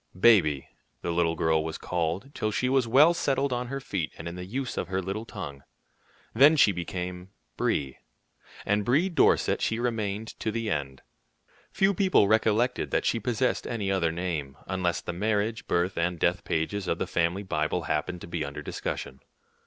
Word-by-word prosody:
"Baby," 85 - +4 0.4
the 85 - -1
little 85 -1 +1
girl 80 -1 +2
was 80 0 -4
called 90 - -2
till 110 - -1
she 125 +4 0
was 130 -2 +2
well 145 +8 +6
settled 135 -4 0
on 125 0 -2
her 135 +2 -4
feet 95 - -3
and - - -7
in 85 - -5
the 90 0 -6
use 130 +5 -3
of - - -2
her 95 +1 -1
little 95 +4 -4
tongue. 80 -11 -7 0.7
Then 140 +7 +7
she 125 -8 +5
became 90 0 -5 0.3
"Brie," 70 -2 -1 0.7
and 105 +1 +1
Brie 145 - +2
Dorset 170 - +3
she 110 - 0
remained 110 -3 -2
to - - -1
the 115 -1 -2
end. 70 -3 -3 0.7
Few 195 +1 +3
people 185 - +4
recollected 110 +3 +2
that - - 0
she 115 - +1
possessed 120 +3 0
any 105 -5 -2
other 85 -4 +1
name, 80 -6 -3
unless 90 -2 -1
the 85 - -5
marriage, 110 +4 -1
birth, 85 +1 0
and 90 +1 0
death - - +1
pages 95 +5 -1
of 85 - 0
the - - -1
family 85 +4 0
Bible 85 -2 -1
happened 85 +3 -2
to - - -8
be 85 -2 -3
under 70 +1 -6
discussion. 65 -1 -5
95 Hz, 180 wpm, -27 LUFS, 85-115 Hz, 0.7 s, Then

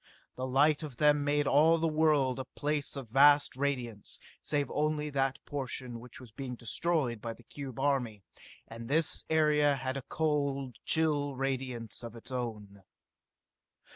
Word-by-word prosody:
The 130 +1 -3
light 145 +4 +3
of 145 -6 -7
them 150 -1 +4
made 145 0 +1
all 155 +4 +5
the 165 0 +1
world 150 -5 +2
a 130 - -4
place 145 -1 -2
of 135 -5 -7
vast 145 +2 +5
radiance, 125 -6 -3 0.2
save 145 -3 -1
only 150 0 -1
that 135 -1 0
portion 130 -4 -4
which 125 +1 -11
was 125 -4 -13
being 125 +2 -6
destroyed 125 -1 0
by 115 -1 -4
the 120 - -18
cube 135 0 -8
army, 125 -7 0 0.4
and 115 +1 -9
this 155 +4 +2
area 150 -2 +3
had 130 0 -3
a - - -4
cold, 140 -5 -1
chill 145 -3 +2
radiance 130 -4 -3
of 115 -1 -8
its 115 +3 -10
own. 105 -5 -5
135 Hz, 155 wpm, -31 LUFS, 125-150 Hz, 0.4 s, all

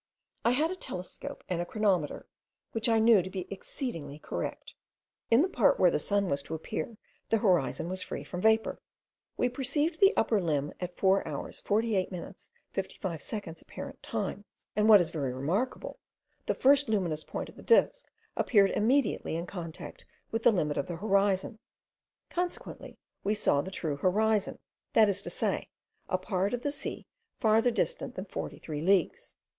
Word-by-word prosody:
I 235 - +4
had 310 +6 +2
a - - -3
telescope 180 - -7
and 175 -2 -1
a - - -2
chronometer, 195 -8 0 0.5
which 225 +1 -1
I 225 - +4
knew 220 -2 +6
to 185 - -6
be 185 -1 -5
exceedingly 165 - -6
correct. - - -5 0.6
In 235 +6 +6
the - - +2
part 250 - +3
where 180 -2 +6
the - - +1
sun 200 +4 +1
was 140 -4 0
to 155 +3 -5
appear 160 +6 -5 0.3
the 225 - +4
horizon 180 -7 +2
was 185 +1 -3
free - - -5
from 180 - -6
vapour. 220 +1 +2 0.6
We - - +2
perceived 290 +6 -1
the 390 0 +7
upper 220 -2 +3
limb 150 -4 -1
at 180 -1 -5
4 195 0 +3
hours - - -5
48 210 -3 +1
minutes 180 -2 -8 0.2
55 170 -6 -4
seconds 185 -7 -6
apparent - - -9
time, - - -3 0.3
and 210 +1 +3
what 210 -2 +10
is 170 -1 -2
very 140 -6 -2
remarkable, 195 - -2 0.5
the - - +1
first 275 -1 +4
luminous 175 -8 0
point - - -5
of - - -14
the - - -12
disk - - +3 0.3
appeared 200 -4 +4
immediately 240 - +1
in 170 +1 -2
contact 170 -4 -8 0.2
with 225 - -1
the 235 - +6
limit 150 -8 0
of - - -1
the 175 - -4
horizon, 200 +2 +1 0.7
consequently 355 0 -4 0.3
we 210 +2 +1
saw 140 -8 +2
the 185 - -6
true 160 -6 -3
horizon; 210 +5 +1 0.4
that 220 -1 +6
is 200 0 0
to - - -6
say, - - -1 0.4
a 185 - +2
part 190 +3 -1
of 245 - -8
the 285 - 0
sea - - -5 0.3
farther 225 +1 +4
distant 485 - -1
than - - -5
43 150 -2 -5
leagues. 185 0 +1
200 Hz, 170 wpm, -30 LUFS, 175-225 Hz, 0.7 s, what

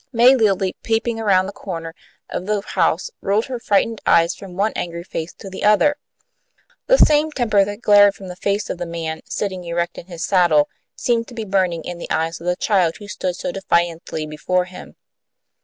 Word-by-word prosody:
May 245 +2 +6
Lilly, 195 -5 +1
peeping 225 0 -1
around 195 -4 +3
the 195 - -5
corner 165 -5 -6 0.3
of 185 - -5
the 210 -1 0
house, 485 - 0
rolled 205 +3 +1
her 255 -2 -5
frightened 220 0 +1
eyes 165 0 +4
from 190 -3 -11
one 205 +3 0
angry 170 0 -4
face 165 -2 -5
to - - -11
the 190 - -7
other. 210 +8 +4 0.9
The - - +5
same 305 -3 +4
temper 215 -8 +2
that 205 +3 -6
glared 205 -1 +6
from 195 - -10
the 180 - -7
face 200 +2 -1
of 180 - -6
the 175 - -4
man, 165 -1 -4
sitting 190 -3 -3
erect 170 0 -2
in 170 - -12
his 170 -2 -5
saddle, 170 -6 +3 0.3
seemed 230 -1 0
to 245 - -12
be 225 -2 -4
burning 185 -4 0
in 175 -1 -6
the - - -7
eyes 165 +1 -1
of 170 - -7
the 180 - +2
child, 180 -5 +1
who 205 - -11
stood 185 -3 -3
so 270 - -4
defiantly 170 -5 -1
before 180 +4 -1
him. 180 0 -12
190 Hz, 200 wpm, -20 LUFS, 170-215 Hz, 0.9 s, May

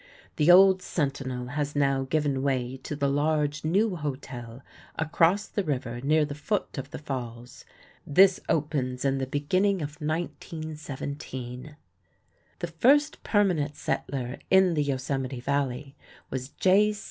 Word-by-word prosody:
The 150 +3 +3
old 190 +1 +7
Sentinel 135 -7 -3
has 145 +1 -3
now 135 -2 +2
given 145 -3 +1
way 130 -2 -1
to 150 - -6
the 140 -1 0
large 145 +1 0
new 190 +5 +2
hotel 130 -4 -6 0.3
across 165 +5 +2
the 205 - -2
river 125 -6 -3
near 150 +3 +3
the 145 - -6
foot 165 +1 -2
of 135 +1 -6
the - - -7
falls. 125 -4 -7 0.4
This 190 +5 +5
opens 140 -5 -1
in 135 0 +1
the 130 - -2
beginning 185 +9 +1
of 150 +2 -7
1917. 150 -4 -5 0.8
The 175 - -3
first 270 - +3
permanent 175 -9 +1
settler 130 -3 -3
in 190 -2 +5
the 150 - +1
Yosemite 135 -2 -2
Valley 140 +1 -2 0.4
was 130 0 -4
J. 205 +6 +3
145 Hz, 135 wpm, -27 LUFS, 135-165 Hz, 0.8 s, old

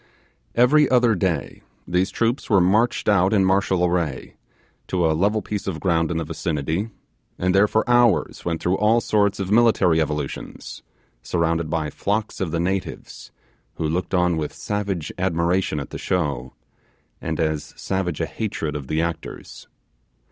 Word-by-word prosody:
Every 140 +4 +5
other 125 -2 +4
day, 85 -7 -2 0.3
these 90 +2 +1
troops 115 +3 -1
were 100 - +5
marched 105 +7 +2
out 100 -1 +4
in 100 -3 +4
martial 95 -1 +2
array, 85 -6 -2 0.5
to 90 -2 0
a 80 - +3
level 105 +6 +1
piece 105 -2 -4
of 85 -5 -3
ground 85 -1 +1
in 85 - -1
the 80 - -1
vicinity, 80 +4 -2 0.5
and 90 +1 +1
there 100 +2 +5
for 110 +1 0
hours 120 -3 +3
went 85 -2 -3
through 90 +2 +1
all 110 +3 +4
sorts 100 -3 +1
of 95 0 -3
military 110 -8 +4
evolutions, 75 -2 -5 0.4
surrounded 85 +2 0
by 80 -2 -1
flocks 105 +1 -2
of 95 - -1
the 85 +1 -2
natives, 95 +2 -4 0.4
who 80 - -2
looked 90 +4 -1
on 90 -2 +2
with 75 -2 -3
savage 100 -6 -3
admiration 90 -2 0
at 70 - -7
the - - -6
show, 70 -8 -2 0.7
and - - -3
as 80 -2 -1
savage 95 -5 -2
a - - 0
hatred 80 -9 -4
of 70 -3 -5
the 80 +4 0
actors. 85 -1 -6
90 Hz, 160 wpm, -22 LUFS, 80-100 Hz, 0.7 s, Every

